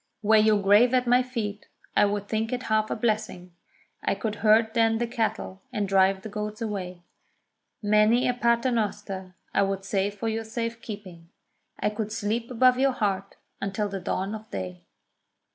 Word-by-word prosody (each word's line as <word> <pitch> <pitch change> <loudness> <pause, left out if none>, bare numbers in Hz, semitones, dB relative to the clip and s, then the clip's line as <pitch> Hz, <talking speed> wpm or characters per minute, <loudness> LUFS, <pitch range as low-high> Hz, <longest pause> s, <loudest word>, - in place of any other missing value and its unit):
Were 220 +1 +5
your 215 -1 +4
grave 205 +6 +5
at 250 0 +2
my 245 +1 +4
feet, 225 -5 -4 0.3
I - - +5
would 205 0 -2
think 220 +1 -1
it 250 0 -2
half 215 -2 +1
a - - -1
blessing; 215 -5 -2 0.5
I - - 0
could 210 +1 -3
herd 220 +1 +4
then 225 -1 +3
the 240 - 0
cattle, 220 -4 -3
and 210 -5 -1
drive 190 0 +3
the - - -5
goats 210 +1 -5
away; 185 -6 -5 0.8
Many 215 +4 +4
a 250 - +2
Paternoster 220 -6 -1 0.2
I - - +3
would 195 0 -1
say 195 0 0
for 205 +2 -5
your 225 0 -1
safe 230 +1 -4
keeping; 185 -7 -9 0.5
I 210 - 0
could 215 0 -4
sleep 225 +2 -2
above 250 +1 +4
your 270 0 +3
heart, 200 -4 -2 0.3
until 195 +1 -2
the 195 -1 -4
dawn 190 +3 -2
of 220 0 -8
day. 90 -2 -6
215 Hz, 175 wpm, -26 LUFS, 195-230 Hz, 0.8 s, Were